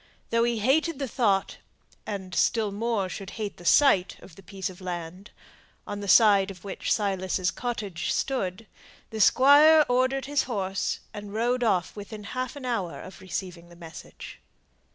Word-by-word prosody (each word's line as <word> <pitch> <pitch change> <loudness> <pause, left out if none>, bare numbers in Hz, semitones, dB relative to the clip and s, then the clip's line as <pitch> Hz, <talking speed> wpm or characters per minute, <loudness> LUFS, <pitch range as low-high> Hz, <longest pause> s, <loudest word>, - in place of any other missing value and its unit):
Though 230 0 +3
he 235 -1 0
hated 285 +8 +1
the 275 -1 -3
thought, 205 -6 0 0.5
and 190 -3 -6
still 220 +3 +1
more, 215 -1 -1
should 190 +1 -7
hate 210 -2 -5
the 175 - -14
sight 195 -6 +4
of 175 - -15
the 195 - -14
piece 190 0 -5
of 185 0 -10
land, 180 +2 -6 0.6
on 205 - -5
the 200 - -6
side 200 -2 +5
of 185 -3 -11
which 200 - -4
Silas's 190 -3 0
cottage 205 -9 -4
stood, 225 -6 -2 0.5
the 220 -1 -3
Squire 295 +6 +6
ordered 255 +1 +1
his 285 0 0
horse, 195 -5 -2
and 205 -1 -8
rode 245 +2 0
off 185 -6 0
within 210 +1 -8
half 255 +5 -4
an 280 -3 -8
hour 210 -9 -3
of 190 - -11
receiving 180 -2 -6
the 175 - -15
message. 165 -2 -11
205 Hz, 165 wpm, -26 LUFS, 185-245 Hz, 0.6 s, Squire